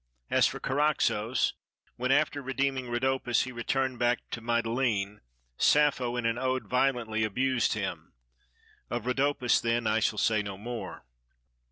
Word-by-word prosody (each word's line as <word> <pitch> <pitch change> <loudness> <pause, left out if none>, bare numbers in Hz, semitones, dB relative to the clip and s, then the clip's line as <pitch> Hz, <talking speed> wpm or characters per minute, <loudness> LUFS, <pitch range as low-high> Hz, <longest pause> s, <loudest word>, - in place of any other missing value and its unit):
As - - +5
for - - -5
Charaxos, 130 -5 +1 0.4
when 125 +2 -1
after 145 0 +2
redeeming 135 -1 -1
Rhodopis 125 0 +1
he 130 - -6
returned 130 +1 -1
back 120 0 +1
to 120 - -4
Mytilene, 115 -3 0 0.4
Sappho 140 -5 +3
in 120 - -2
an 115 +1 0
ode 130 0 -1
violently 120 -4 0
abused 125 +3 +1
him. - - -4 0.8
Of 120 -1 -3
Rhodopis 135 0 +2
then 115 0 0
I 110 +1 +2
shall 105 0 0
say 110 0 +2
no 100 -2 -6
more. 115 - -7
120 Hz, 140 wpm, -29 LUFS, 115-130 Hz, 0.8 s, As